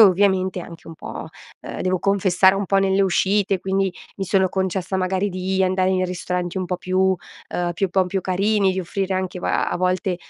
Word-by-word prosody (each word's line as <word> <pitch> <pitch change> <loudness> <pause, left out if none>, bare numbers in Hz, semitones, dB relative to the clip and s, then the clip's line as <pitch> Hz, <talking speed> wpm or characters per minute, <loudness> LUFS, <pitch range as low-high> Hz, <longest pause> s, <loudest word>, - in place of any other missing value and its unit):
ovviamente 190 -2 +4
anche 170 -1 -11
un 165 - -8
po' 160 - -7 0.4
uhm, - - -6
devo 185 0 +1
confessare, 190 -1 +3
un 200 +1 -1
po' 195 - +2
nelle 195 0 +3
uscite. 195 +1 +2
Quindi 190 -1 0 0.2
mi 195 - -2
sono 190 0 +2
concessa 190 0 -1
magari 190 +2 0
di 190 +1 -1
andare 185 0 +2
in 185 0 +1
ristoranti 180 0 -3
un 185 - -2
po' 180 - -2
più 185 +1 -2
uhm, 180 -1 -1
più 195 - 0
un - - -13
po' 190 -1 +2
più 190 +1 -1
carini, 195 +1 +2
di 190 - -2
offrire 190 +2 -2
anche 185 -1 -2
a-a - - 0
volte 185 0 0
190 Hz, 200 wpm, -22 LUFS, 185-195 Hz, 0.4 s, ovviamente